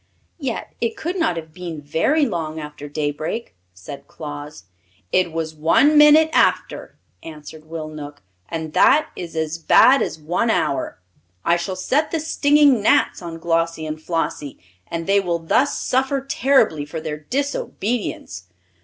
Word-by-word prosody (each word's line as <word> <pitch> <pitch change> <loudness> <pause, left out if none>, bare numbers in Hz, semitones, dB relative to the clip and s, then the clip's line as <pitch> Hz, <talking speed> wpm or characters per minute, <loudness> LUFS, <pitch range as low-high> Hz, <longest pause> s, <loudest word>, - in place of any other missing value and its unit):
"Yet 265 -6 -4
it 230 -1 -1
could 345 +3 -3
not 320 - 0
have 160 -1 -8
been 170 -2 -7
very 165 - +1
long 160 - -3
after 150 -1 -8
daybreak," 155 +9 -3 0.2
said 90 +10 -11
Claus. 145 - -8 0.5
"It 185 -2 +2
was 160 -1 -3
one 165 - +3
minute 300 +2 +7
after," - - +1 0.2
answered 155 0 -11
Will 160 -1 -6
Knook, 150 -5 -9 0.3
"and 160 -1 -5
that 305 - +4
is 170 -2 -7
as 160 +1 -2
bad 255 +10 +6
as - - -2
one 175 +9 -1
hour. 140 - -1 0.5
I 170 - +4
shall 185 +2 -3
set 275 +11 0
the 330 - -1
stinging 290 -5 +3
gnats 205 - +2
on 170 -2 -7
Glossie 165 -1 -1
and 155 0 -5
Flossie, 160 -4 -3 0.3
and 165 0 -4
they 200 +2 +3
will 175 -3 -1
thus 170 - +1
suffer 265 +2 0
terribly 265 - +2
for 145 +3 -6
their 155 -1 -5
disobedience." 225 - -3
165 Hz, 150 wpm, -21 LUFS, 155-250 Hz, 0.5 s, minute